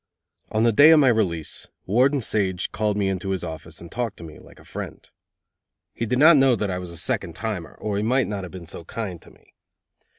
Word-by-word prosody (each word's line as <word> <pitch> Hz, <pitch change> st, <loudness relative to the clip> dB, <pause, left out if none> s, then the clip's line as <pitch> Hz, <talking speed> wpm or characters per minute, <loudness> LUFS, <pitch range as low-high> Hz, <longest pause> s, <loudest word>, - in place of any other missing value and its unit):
On 110 Hz, +1 st, +1 dB
the 115 Hz, -, +4 dB
day 145 Hz, +8 st, +7 dB
of 160 Hz, -1 st, +8 dB
my 135 Hz, -3 st, +5 dB
release, 90 Hz, -9 st, 0 dB, 0.2 s
Warden 130 Hz, +7 st, +3 dB
Sage 95 Hz, -5 st, -1 dB
called 105 Hz, -1 st, -1 dB
me 95 Hz, -1 st, +1 dB
to 95 Hz, -, -5 dB
his 95 Hz, -2 st, -2 dB
office 80 Hz, -1 st, -7 dB
and 85 Hz, -, -12 dB
talked 120 Hz, -3 st, -3 dB
to -, -, -10 dB
me 80 Hz, -2 st, -11 dB
like -, -, -17 dB
a -, -, -17 dB
friend. -, -, -8 dB, 0.9 s
He 115 Hz, -, -3 dB
did 125 Hz, +3 st, 0 dB
not 155 Hz, +3 st, +7 dB
know 135 Hz, -2 st, +5 dB
that 105 Hz, -3 st, -2 dB
I 90 Hz, -, -2 dB
was 90 Hz, -1 st, -7 dB
a 85 Hz, -, -8 dB
second 80 Hz, +1 st, -2 dB
timer, 90 Hz, -, -5 dB
or 105 Hz, -2 st, -2 dB
he -, -, 0 dB
might 125 Hz, +4 st, +2 dB
not 100 Hz, -2 st, -4 dB
have 90 Hz, -, -7 dB
been 90 Hz, -2 st, -9 dB
so 85 Hz, -, -7 dB
kind 95 Hz, -2 st, -6 dB
to -, -, -16 dB
me. -, -, -24 dB
105 Hz, 235 wpm, -24 LUFS, 90-115 Hz, 0.9 s, of